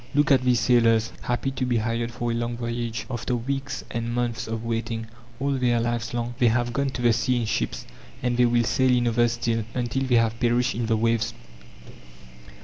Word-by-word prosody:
Look 145 Hz, +2 st, +3 dB
at 135 Hz, -2 st, +5 dB
these 125 Hz, -2 st, +3 dB
sailors, 115 Hz, -1 st, +3 dB
happy 120 Hz, +2 st, -1 dB
to 135 Hz, -, -3 dB
be 125 Hz, -2 st, +1 dB
hired 115 Hz, +1 st, -1 dB
for 120 Hz, 0 st, -2 dB
a -, -, -1 dB
long 120 Hz, 0 st, -2 dB
voyage, 115 Hz, -2 st, -3 dB
after 125 Hz, 0 st, -2 dB
weeks 135 Hz, +2 st, -3 dB
and 115 Hz, 0 st, -3 dB
months 120 Hz, -1 st, -2 dB
of 115 Hz, 0 st, -4 dB
waiting. 115 Hz, 0 st, -2 dB, 0.3 s
All 140 Hz, +2 st, 0 dB
their 125 Hz, -3 st, +2 dB
lives 120 Hz, 0 st, -1 dB
long 120 Hz, 0 st, -3 dB
they 120 Hz, -, +5 dB
have 120 Hz, +1 st, +1 dB
gone 140 Hz, +2 st, 0 dB
to 125 Hz, -1 st, -5 dB
the 120 Hz, -1 st, +5 dB
sea 125 Hz, +3 st, +1 dB
in 115 Hz, -, -1 dB
ships, -, -, -2 dB, 0.4 s
and 125 Hz, -1 st, +1 dB
they 125 Hz, 0 st, +4 dB
will 120 Hz, 0 st, +3 dB
sail 130 Hz, +3 st, +2 dB
in 120 Hz, -1 st, +3 dB
others 120 Hz, 0 st, +2 dB
still, 115 Hz, -1 st, -1 dB
until 125 Hz, +1 st, -1 dB
they 125 Hz, -2 st, +2 dB
have 115 Hz, 0 st, +2 dB
perished 120 Hz, +1 st, +2 dB
in 115 Hz, 0 st, -2 dB
the 110 Hz, -1 st, +2 dB
waves. 115 Hz, 0 st, 0 dB
120 Hz, 210 wpm, -25 LUFS, 115-125 Hz, 0.4 s, at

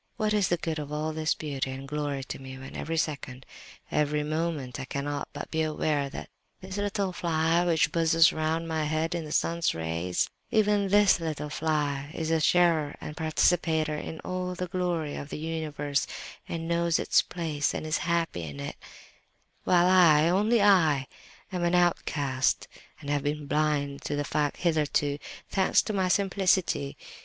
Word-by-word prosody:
What 215 Hz, -1 st, +1 dB
is 205 Hz, -3 st, +3 dB
the 175 Hz, -, +1 dB
good 160 Hz, -1 st, -3 dB
of 145 Hz, -1 st, -6 dB
all 155 Hz, +1 st, -2 dB
this 155 Hz, 0 st, 0 dB
beauty 140 Hz, -3 st, -3 dB
and 135 Hz, +1 st, -6 dB
glory 145 Hz, -2 st, -2 dB
to -, -, -7 dB
me, 130 Hz, 0 st, -8 dB
when 130 Hz, 0 st, -10 dB
every 165 Hz, +2 st, -3 dB
second, 140 Hz, -5 st, -3 dB, 0.5 s
every 150 Hz, 0 st, +1 dB
moment, 155 Hz, -4 st, -2 dB
I 130 Hz, -, -4 dB
cannot 145 Hz, +1 st, -3 dB
but 145 Hz, -, -7 dB
be 160 Hz, -, 0 dB
aware 150 Hz, -2 st, 0 dB
that -, -, -7 dB, 0.3 s
this 190 Hz, +1 st, -7 dB
little 200 Hz, -2 st, -1 dB
fly 165 Hz, 0 st, +1 dB
which 160 Hz, -3 st, +3 dB
buzzes 165 Hz, 0 st, +4 dB
around 160 Hz, +1 st, -1 dB
my 160 Hz, -1 st, -1 dB
head 155 Hz, +2 st, -1 dB
in 170 Hz, -2 st, -3 dB
the 150 Hz, -, -8 dB
sun's 170 Hz, +2 st, +1 dB
rays—even 90 Hz, -, 0 dB
this 205 Hz, -1 st, +5 dB
little 155 Hz, -2 st, -4 dB
fly 145 Hz, -3 st, -1 dB
is 160 Hz, -1 st, -2 dB
a 165 Hz, -, +3 dB
sharer 160 Hz, -2 st, +3 dB
and 150 Hz, -, -7 dB
participator 160 Hz, -1 st, +1 dB
in 160 Hz, +1 st, -6 dB
all 185 Hz, 0 st, -3 dB
the 180 Hz, -, -3 dB
glory 175 Hz, -4 st, -2 dB
of 145 Hz, -, -6 dB
the -, -, -5 dB
universe, 150 Hz, -3 st, -2 dB, 0.4 s
and 165 Hz, -1 st, -4 dB
knows 170 Hz, -1 st, +2 dB
its -, -, +3 dB
place 155 Hz, -5 st, -2 dB
and -, -, -4 dB
is 155 Hz, +1 st, 0 dB
happy 170 Hz, -, -1 dB
in 75 Hz, -3 st, -7 dB
it;—while 175 Hz, -, -3 dB
I—only 185 Hz, +5 st, +5 dB
I, 160 Hz, -9 st, +4 dB, 0.5 s
am 180 Hz, -2 st, -2 dB
an 175 Hz, +1 st, +2 dB
outcast, 145 Hz, -6 st, +1 dB, 0.3 s
and 145 Hz, -, -4 dB
have 145 Hz, -1 st, +1 dB
been 145 Hz, +1 st, -2 dB
blind 145 Hz, -1 st, 0 dB
to 145 Hz, -, -1 dB
the 145 Hz, -, -1 dB
fact 145 Hz, -1 st, -1 dB
hitherto, 150 Hz, -3 st, +1 dB, 0.3 s
thanks 190 Hz, -1 st, +3 dB
to 215 Hz, -, -3 dB
my 190 Hz, -2 st, +1 dB
simplicity! 190 Hz, -6 st, +1 dB
155 Hz, 165 wpm, -28 LUFS, 145-175 Hz, 0.5 s, this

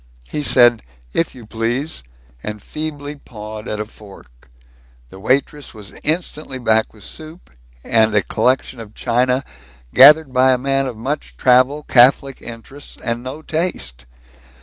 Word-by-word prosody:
He 150 Hz, -, -2 dB
said, 120 Hz, -5 st, +5 dB, 0.3 s
"If 165 Hz, -, -1 dB
you 120 Hz, -3 st, -12 dB
please," 120 Hz, +8 st, -3 dB, 0.4 s
and 105 Hz, +6 st, -5 dB
feebly 150 Hz, +3 st, -6 dB
pawed 110 Hz, -3 st, -9 dB
at 105 Hz, -, -3 dB
a 105 Hz, -, -2 dB
fork. 95 Hz, -, -17 dB, 0.6 s
The 95 Hz, -, -13 dB
waitress 135 Hz, +5 st, -1 dB
was 105 Hz, -2 st, -8 dB
instantly 155 Hz, -4 st, -3 dB
back 110 Hz, -3 st, +1 dB
with 105 Hz, -3 st, -14 dB
soup, 160 Hz, -, -10 dB, 0.3 s
and 110 Hz, -1 st, +3 dB
a 100 Hz, -, +3 dB
collection 130 Hz, +4 st, 0 dB
of 110 Hz, -2 st, -11 dB
china 125 Hz, +2 st, +1 dB, 0.5 s
gathered 145 Hz, +1 st, +7 dB
by 130 Hz, 0 st, +4 dB
a -, -, +1 dB
man 135 Hz, +1 st, 0 dB
of 120 Hz, -4 st, -6 dB
much 140 Hz, +7 st, -4 dB
travel, 130 Hz, +4 st, +3 dB
catholic 130 Hz, +2 st, +4 dB
interests, 120 Hz, +5 st, -11 dB
and 115 Hz, 0 st, -3 dB
no 130 Hz, +5 st, -8 dB
taste. 65 Hz, -, -4 dB
125 Hz, 145 wpm, -19 LUFS, 110-145 Hz, 0.6 s, gathered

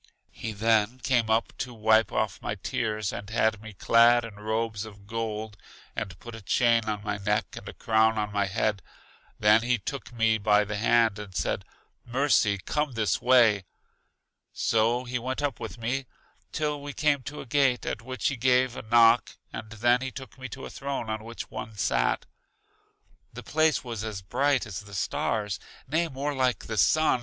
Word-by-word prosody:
He 110 Hz, -, -5 dB
then 110 Hz, +2 st, +2 dB
came 120 Hz, -4 st, +1 dB
up 110 Hz, +1 st, +1 dB
to 125 Hz, -2 st, -4 dB
wipe 110 Hz, 0 st, +3 dB
off 110 Hz, -2 st, -1 dB
my 105 Hz, -, -3 dB
tears 105 Hz, +1 st, -2 dB
and 100 Hz, -, -6 dB
had 110 Hz, -1 st, +1 dB
me 110 Hz, -1 st, -10 dB
clad 115 Hz, +4 st, +5 dB
in 115 Hz, -, -9 dB
robes 110 Hz, 0 st, -2 dB
of 100 Hz, -2 st, -12 dB
gold, 110 Hz, -1 st, -4 dB, 0.4 s
and 90 Hz, -2 st, -4 dB
put 120 Hz, +4 st, -10 dB
a 115 Hz, -, -8 dB
chain 115 Hz, +4 st, +2 dB
on 105 Hz, -1 st, -3 dB
my 105 Hz, -1 st, -3 dB
neck, 100 Hz, -, -1 dB
and -, -, -8 dB
a -, -, -8 dB
crown 110 Hz, 0 st, +2 dB
on 105 Hz, -1 st, -2 dB
my 100 Hz, -1 st, +1 dB
head. 100 Hz, +1 st, 0 dB, 0.6 s
Then 105 Hz, +1 st, +5 dB
he 120 Hz, +1 st, +1 dB
took 130 Hz, +7 st, -6 dB
me 115 Hz, -2 st, +2 dB
by 105 Hz, 0 st, +4 dB
the 105 Hz, 0 st, -4 dB
hand 115 Hz, -1 st, +3 dB
and 100 Hz, -3 st, -9 dB
said, -, -, -1 dB, 0.4 s
Mercy, 120 Hz, -5 st, +2 dB
come 150 Hz, +7 st, -2 dB
this 110 Hz, -4 st, 0 dB
way. 115 Hz, -6 st, +5 dB, 0.9 s
So 115 Hz, +3 st, +1 dB
he 125 Hz, 0 st, -3 dB
went 130 Hz, +4 st, -3 dB
up 140 Hz, -4 st, -1 dB
with 115 Hz, -, -6 dB
me 125 Hz, +3 st, -2 dB, 0.4 s
till 150 Hz, -1 st, -2 dB
we 145 Hz, 0 st, -6 dB
came 145 Hz, -2 st, +2 dB
to 145 Hz, +4 st, -7 dB
a -, -, -9 dB
gate, 135 Hz, -2 st, +2 dB
at 110 Hz, -, -3 dB
which 130 Hz, +2 st, -3 dB
he 135 Hz, -, -4 dB
gave 125 Hz, 0 st, +3 dB
a -, -, -5 dB
knock 115 Hz, +1 st, +4 dB, 0.2 s
and 110 Hz, -1 st, -6 dB
then 120 Hz, +3 st, +2 dB
he 130 Hz, -, -3 dB
took 130 Hz, 0 st, -10 dB
me 130 Hz, 0 st, -8 dB
to -, -, -8 dB
a -, -, -8 dB
throne 135 Hz, -5 st, -4 dB
on 110 Hz, 0 st, -4 dB
which 115 Hz, +1 st, -8 dB
one 110 Hz, -1 st, -7 dB
sat. -, -, +1 dB, 1.1 s
The -, -, -8 dB
place 155 Hz, 0 st, +2 dB
was 115 Hz, -4 st, -5 dB
as 105 Hz, -4 st, -5 dB
bright 140 Hz, +7 st, +1 dB
as 95 Hz, -3 st, -6 dB
the 100 Hz, -1 st, -11 dB
stars, 105 Hz, +2 st, -1 dB, 0.3 s
nay 160 Hz, +5 st, +1 dB
more 145 Hz, 0 st, -3 dB
like 130 Hz, -2 st, 0 dB
the 110 Hz, -, -4 dB
sun. 155 Hz, +7 st, +4 dB
115 Hz, 190 wpm, -27 LUFS, 105-125 Hz, 1.1 s, clad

